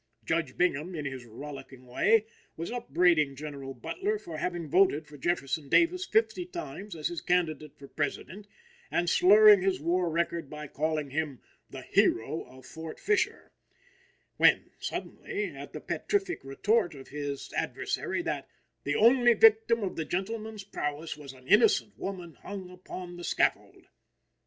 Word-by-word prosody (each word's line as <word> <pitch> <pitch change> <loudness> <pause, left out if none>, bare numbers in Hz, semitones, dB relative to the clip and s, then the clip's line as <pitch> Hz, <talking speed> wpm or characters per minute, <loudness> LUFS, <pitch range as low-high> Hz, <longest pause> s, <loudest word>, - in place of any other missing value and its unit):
Judge 165 -3 -1
Bingham, 175 0 0
in 150 -2 -4
his 130 -3 -5
rollicking 135 +2 -10
way, 215 - +3 0.3
was 165 +5 -4
upbraiding 165 - +2
General 140 -2 -7
Butler 400 - -2
for 165 - -8
having 175 -1 -3
voted 160 -2 +3
for 150 - -14
Jefferson 145 -2 -2
Davis 360 +2 +3
fifty 435 -4 +2
times 340 - -7
as 155 -2 -2
his 175 -2 -5
candidate 155 -4 -1
for 140 - -12
President, 175 +8 -4 0.4
and 175 - 0
slurring 205 +3 +7
his 190 -6 +1
war 175 +3 +1
record 170 -2 -1
by 150 0 -7
calling 150 -1 -2
him 150 -3 -2 0.3
"the - - -8
hero 115 +8 +2
of 130 +1 -15
Fort 160 -1 -8
Fisher;" 425 0 0 0.9
when, - - +4
suddenly, 410 +1 -4
at - - -9
the - - -6
petrific 390 -3 -2
retort 175 +6 +1
of 135 -1 -12
his 145 -1 -5
adversary - - -2
that - - -3 0.3
"the 145 +1 -1
only 240 +1 +6
victim 225 +1 +5
of 190 - -3
the 160 - -2
gentleman's 215 +4 -4
prowess 155 -4 -4
was 145 -3 -10
an 130 -1 -17
innocent 210 - +4
woman 180 -4 -5
hung 190 -3 -7
upon 180 -1 -8
the 175 - -8
scaffold!" - - 0
170 Hz, 150 wpm, -29 LUFS, 145-210 Hz, 0.9 s, slurring